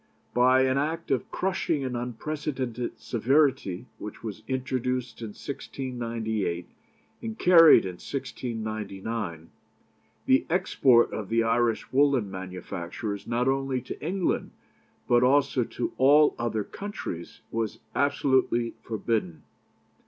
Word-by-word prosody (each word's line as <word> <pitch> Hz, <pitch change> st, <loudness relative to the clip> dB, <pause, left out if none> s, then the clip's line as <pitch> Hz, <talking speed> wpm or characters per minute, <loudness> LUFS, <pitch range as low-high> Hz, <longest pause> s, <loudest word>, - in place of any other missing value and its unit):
By 130 Hz, +1 st, +5 dB
an 130 Hz, +1 st, +2 dB
Act 160 Hz, +2 st, -2 dB
of 130 Hz, -, 0 dB
crushing 180 Hz, -6 st, -1 dB
and 130 Hz, -2 st, -3 dB
unprecedented 125 Hz, 0 st, -4 dB
severity, 130 Hz, -, +1 dB
which 105 Hz, -, -8 dB
was 110 Hz, -2 st, -6 dB
introduced 125 Hz, -2 st, -2 dB
in 115 Hz, -, -4 dB
1698 115 Hz, -7 st, -4 dB, 0.5 s
and 225 Hz, -1 st, -5 dB
carried 165 Hz, -, +8 dB
in 90 Hz, -2 st, -5 dB
1699, 110 Hz, -, -5 dB, 0.7 s
the 130 Hz, -, +3 dB
export 140 Hz, -9 st, +4 dB
of 105 Hz, -3 st, -4 dB
the 115 Hz, 0 st, +2 dB
Irish 115 Hz, 0 st, +1 dB
woollen 135 Hz, -7 st, +3 dB
manufactures, 95 Hz, +2 st, -5 dB
not 120 Hz, +2 st, 0 dB
only 135 Hz, -1 st, +1 dB
to 130 Hz, -, -8 dB
England, 180 Hz, +3 st, -1 dB, 0.6 s
but 120 Hz, 0 st, +4 dB
also 135 Hz, 0 st, +3 dB
to 120 Hz, -, -4 dB
all 145 Hz, +3 st, +6 dB
other 110 Hz, -2 st, -1 dB
countries, 100 Hz, -, -7 dB
was 115 Hz, -2 st, -2 dB, 0.2 s
absolutely 130 Hz, -4 st, +2 dB
forbidden. 110 Hz, -7 st, -2 dB
125 Hz, 110 wpm, -27 LUFS, 110-135 Hz, 0.7 s, carried